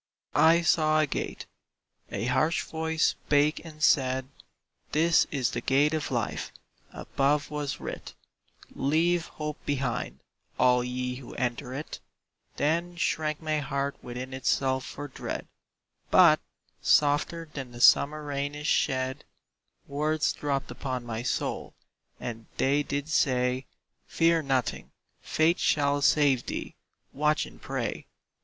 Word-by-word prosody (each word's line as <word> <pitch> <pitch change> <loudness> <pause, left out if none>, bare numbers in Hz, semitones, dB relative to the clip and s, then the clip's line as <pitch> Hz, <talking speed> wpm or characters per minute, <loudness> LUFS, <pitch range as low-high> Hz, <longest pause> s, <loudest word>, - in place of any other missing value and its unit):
I 165 +3 +5
saw 155 -2 +3
a 155 - +4
gate: 145 - -4 0.7
a - - -2
harsh 155 +6 +1
voice 160 0 0
spake 150 +2 +1
and 155 -2 -9
said, 130 -2 +3 0.6
"This 165 +2 +4
is 130 -4 0
the 120 - -3
gate 140 +5 +3
of 155 -2 -2
Life;" 120 -4 -2 0.4
above 145 +2 0
was 145 -2 -3
writ, - - -7 0.6
"Leave 165 +4 +1
hope 150 -1 -6
behind, 130 - -2 0.4
all 125 -1 +4
ye 125 0 -3
who 130 - -10
enter 125 +1 -2
it;" 150 +3 -6 0.6
Then 170 +4 0
shrank 155 -2 -1
my 155 -1 0
heart 140 0 -2
within 125 +2 -6
itself 130 0 0
for 145 +1 -6
dread; 135 - -5 0.6
But, - - +7 0.4
softer 150 +3 +2
than 135 -4 -6
the 120 - -10
summer 150 +4 +5
rain 145 0 -3
is 150 0 -7
shed, 130 -1 0 0.6
Words 150 +2 0
dropt 140 -3 -2
upon 125 -1 -4
my 115 -1 -4
soul, 125 - -3 0.4
and 115 -2 -6
they 140 +2 +2
did 145 0 -3
say, 130 -4 +1 0.4
"Fear 165 0 +3
nothing, 135 -4 -2 0.3
Faith 160 +3 +2
shall 145 -1 +2
save 140 -4 +3
thee, - - -4 0.4
watch 150 +1 +1
and - - -14
pray!" - - -4
145 Hz, 130 wpm, -28 LUFS, 130-155 Hz, 0.7 s, But